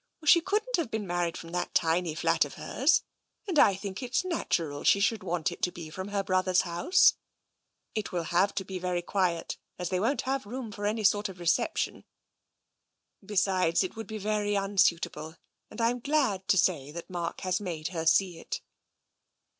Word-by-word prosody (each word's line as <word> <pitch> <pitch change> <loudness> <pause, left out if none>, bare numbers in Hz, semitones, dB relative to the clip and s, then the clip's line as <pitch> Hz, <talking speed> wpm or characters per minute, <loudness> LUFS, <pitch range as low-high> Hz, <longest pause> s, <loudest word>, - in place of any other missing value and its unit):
" 315 - -17
She 340 +3 +7
couldn't 425 +7 0
have 330 -9 -1
been 220 -2 -3
married 175 -2 -1
from 165 - -9
that 180 0 -3
tiny 165 -1 +1
flat 165 +1 +2
of 145 - -7
hers, 275 +6 +2 0.4
and 345 -6 +2
I 200 - +6
think 195 +3 -6
it's 255 +8 -1
natural 165 - -1
she 200 - +5
should 215 +2 +1
want 170 -2 -1
it - - -9
to 180 - +1
be 165 -3 -9
from 185 +3 -6
her 200 -1 -1
brother's 185 -1 +2
house. 175 - +3 0.8
It 215 -2 -3
will 175 -2 -1
have 180 +5 +1
to 190 - -2
be 190 -1 -5
very 180 -1 -2
quiet, 180 -3 -1 0.2
as 180 -1 -3
they 185 - 0
won't 235 +6 +1
have 265 -4 -2
room 240 0 -5
for 205 0 -3
any 215 +1 -1
sort 205 0 +3
of 185 - -10
recep 175 -1 +1
tion. - - -2 1.2
Besides, 190 -3 +2
it 185 - -5
would 225 0 -7
be 220 - -5
very 210 0 0
unsuitable, 180 -5 +1 0.3
and - - -10
I'm 235 +2 +1
glad 245 -9 0
to 205 -1 +3
say 155 -7 +2
that 170 +2 -7
Mark 170 -1 -4
has 185 +1 -1
made 165 -5 -4
her 165 -3 -3
see 175 0 +3
it." - - -5
190 Hz, 195 wpm, -29 LUFS, 175-215 Hz, 1.2 s, She